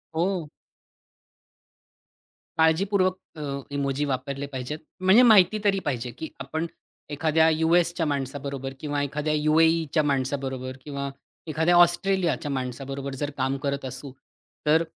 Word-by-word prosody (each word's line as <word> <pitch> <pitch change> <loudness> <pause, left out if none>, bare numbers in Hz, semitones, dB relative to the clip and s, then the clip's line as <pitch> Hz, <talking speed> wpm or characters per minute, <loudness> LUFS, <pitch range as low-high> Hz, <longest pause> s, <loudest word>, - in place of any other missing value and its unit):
हो. 175 -2 0 2.1
काळजीपूर्वक 185 +4 +3 0.2
अ, 155 - -8 0.3
इमोजी 140 0 0
वापरले 140 +1 -3
पाहिजेत. 130 +4 -4 0.2
म्हणजे 190 +5 +6
माहिती 215 -3 +6
तरी 200 -2 +3
पाहिजे 125 -4 -2
की 160 - -5
आपण, 160 +1 -3 0.4
एखाद्या 160 +2 +3
यू-एसच्या 165 +1 +2
माणसाबरोबर 140 -1 -3
किंवा 145 -1 -2
एखाद्या 150 +2 -2
यू-ए-ईच्या 155 +1 +3
माणसाबरोबर 130 -2 -2
किंवा 140 -1 -4 0.4
एखाद्या 160 +3 +2
ऑस्ट्रेलियाच्या 175 -2 +3
माणसाबरोबर 135 +1 -4
जर 145 +2 -2
काम 135 +1 0
करत 140 -1 -2
असू 130 +2 -6 0.5
तर, 155 +2 +4
150 Hz, 110 wpm, -25 LUFS, 140-165 Hz, 2.1 s, म्हणजे